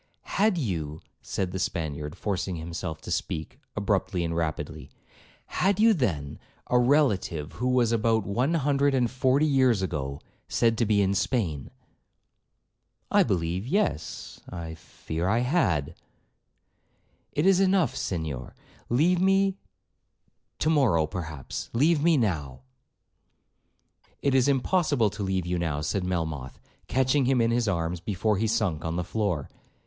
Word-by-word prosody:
'Had 210 -2 +1
you,' 80 - -3 0.2
said 95 -2 -3
the 95 - -4
Spaniard, 80 -7 -3
forcing 95 -3 -2
himself 80 -1 -5
to - - -7
speak, 80 - -3 0.2
abruptly 100 -3 0
and 85 0 -2
rapidly, 80 -2 -3 0.6
'had 195 +2 0
you, 225 +1 +6
then, 80 - -2 0.3
a 125 - +5
relative 110 - +2
who 125 - -3
was, 125 -3 +3
about 110 -2 +2
one 125 - 0
hundred 140 -2 +2
and 125 -3 +1
forty 130 +3 +2
years 130 -8 +3
ago, 70 -6 -3 0.3
said 115 -1 +2
to 115 - +2
be 100 -1 +3
in 95 0 +1
Spain.' 95 - -1 1.4
'I - - +5
believe—yes, 90 - -1
I 85 -2 -6
fear—I 85 +6 -2
had.' 95 - +1 1.4
'It 150 - +1
is 190 -1 +5
enough, 190 -4 +3
Senhor—leave 95 - -2
me—to 190 - -2
morrow 115 - +3
perhaps—leave 90 - -1
me 165 0 +4
now.' 75 - -1 1.6
'It 140 - +2
is 130 0 +4
impossible 140 - +2
to - - -7
leave 95 -2 -1
you 90 0 -1
now,' 75 -4 -1
said 90 +5 -1
Melmoth, 80 -7 -3 0.3
catching 130 +2 +2
him 130 0 +3
in 115 0 +3
his 120 -1 +1
arms 85 -2 -1
before 105 +3 0
he 110 - +1
sunk 105 -9 0
on 80 0 -2
the 90 - -1
floor. 90 -6 -1
105 Hz, 130 wpm, -27 LUFS, 85-135 Hz, 1.6 s, you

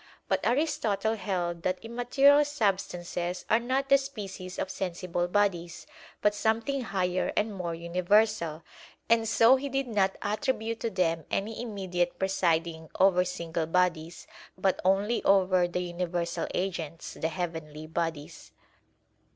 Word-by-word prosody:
But - - +1
Aristotle 230 -6 +1
held 180 -5 -2
that 185 +2 0
immaterial 270 +5 +4
substances 185 -9 -2
are 220 - +5
not 260 +3 -1
the 275 0 +6
species 195 -9 -7
of 190 - -2
sensible 180 -2 -2
bodies, 175 -3 0 0.4
but 210 - +4
something 225 +6 0
higher 185 -5 -1
and 215 0 +1
more 175 -3 -3
universal; 175 -1 +1 0.5
and 225 -1 +3
so 230 +4 +6
he 280 +2 -4
did 270 0 -1
not 200 -5 +1
attribute 220 +2 -1
to 230 - -1
them 165 -5 0
any 220 +3 -2
immediate 180 -6 -2
presiding 170 -4 0
over 185 -1 +5
single 170 -3 -3
bodies, 170 -1 0 0.3
but 190 0 +1
only 195 +5 +2
over 185 -2 +4
the 175 +1 -2
universal 175 -1 -2
agents, 165 -4 -4
the 160 - -2
heavenly 160 -3 -5
bodies. 160 -2 -4
185 Hz, 130 wpm, -28 LUFS, 175-220 Hz, 0.5 s, the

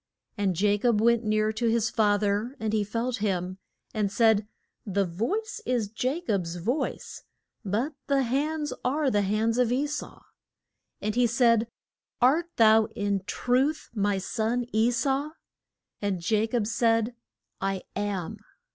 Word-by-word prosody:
And 195 -5 0
Ja 205 0 +3
cob 235 -1 +2
went 235 +1 +3
near 215 0 +1
to 235 +2 -1
his 230 0 +1
fa 210 -2 +3
ther 210 +5 -1
and 220 -1 -2
he 215 -1 +2
felt 230 +4 -2
him, 185 -2 -2 0.3
and 210 -3 0
said, 220 -1 +3 0.4
The 200 -1 0
voice 405 - -3
is 235 - -1
Ja 260 +8 0
cob's 180 - -1
voice, 230 - -3 0.4
but 230 +9 -1
the 275 -1 +2
hands 295 +3 -1
are 275 +1 +1
the 205 - +2
hands 220 +4 +1
of 245 -2 +3
E 265 +4 +1
sau. 295 0 -5 0.8
And 215 +1 -1
he 245 +1 +3
said, 230 -1 +3 0.5
Art 300 +8 +3
thou 220 -1 +6
in 200 -1 0
truth 265 +8 0
my 205 -2 +1
son 230 +5 -1
E 220 +2 +3
sau? 270 +5 0 0.7
And 190 -4 -2
Ja 215 +1 +3
cob 230 -2 0
said, 230 +1 +1 0.5
I 195 -1 -1
am. 200 -4 -3
225 Hz, 150 wpm, -27 LUFS, 205-250 Hz, 0.8 s, thou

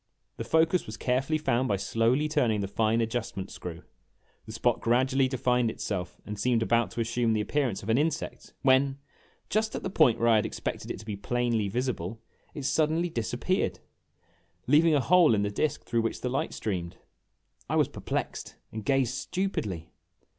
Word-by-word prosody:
The - - -3
focus 160 +2 +2
was 110 -1 -6
carefully 135 +7 0
found 130 -4 +1
by 100 - +1
slowly 115 +8 +1
turning 125 -9 +1
the 100 - -2
fine 110 +3 +1
adjustment 110 -4 -3
screw. 85 -1 -7 0.6
The - - -7
spot 115 +2 0
gradu 130 +3 +2
ally 135 -1 +4
defined 125 -2 +1
itself 95 -5 -4
and 105 -1 -6
seemed 120 0 +2
about 115 +1 +2
to 120 - -2
assume 115 0 +1
the 110 - +1
appearance 125 -4 -1
of 105 - -6
an 115 +4 +4
insect 155 0 -3
when, 135 0 +4 0.5
just 220 +1 +1
at - - -4
the 190 - -3
point 145 -11 +4
where 115 - +2
I 115 - +6
had 105 - +1
expected - - -5
it - - -3
to - - -14
be 105 -2 -4
plainly 115 0 0
visible, 115 -3 -2 0.4
it 145 - -5
suddenly 160 +4 +1
disappeared, 120 - -1 0.9
leaving 155 +4 +5
a 140 - +3
hole 170 -5 +5
in 100 - +1
the 100 - -1
disk 150 +7 -1
through 115 -1 0
which 115 - -3
the 125 - -1
light 130 - -2
streamed! 90 -5 -3 0.7
I - - 0
was - - +4
perplexed, - - -4 0.2
and 110 -1 -6
gazed 135 0 +2
stupidly. 110 - -3
120 Hz, 180 wpm, -28 LUFS, 110-140 Hz, 0.9 s, I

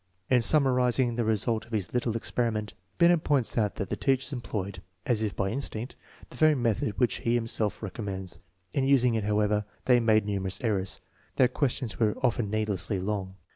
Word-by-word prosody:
In 125 -1 +5
summarizing 125 -2 +3
the 120 0 -1
result 110 +1 0
of 120 - -15
his 105 -4 -2
little 120 -2 0
experiment, 110 -2 -2 0.2
Binet 170 -1 +4
points 140 -5 +1
out 105 -4 +1
that 100 - -4
the - - -1
teachers 135 0 0
employed, 100 -7 -4 0.2
as 120 -6 +1
if 105 -2 -2
by 95 -1 -1
instinct, 120 -1 -3 0.4
the - - -11
very 155 -1 +5
method 115 -5 -1
which 125 - +2
he 120 +1 0
himself 115 -2 -1
recommends. 95 -3 -5 0.3
In 135 -1 +1
using 125 -3 +4
it, 110 -2 -1
however, 105 0 +1 0.2
they 125 -1 +5
made 110 -3 +3
numerous 95 -2 -1
errors. 100 -5 -1 0.3
Their 125 -2 +4
questions 130 -4 -2
were 110 -3 +2
often 120 -4 +1
needlessly 105 -2 -1
long. 95 -1 -3
115 Hz, 175 wpm, -28 LUFS, 105-125 Hz, 0.4 s, In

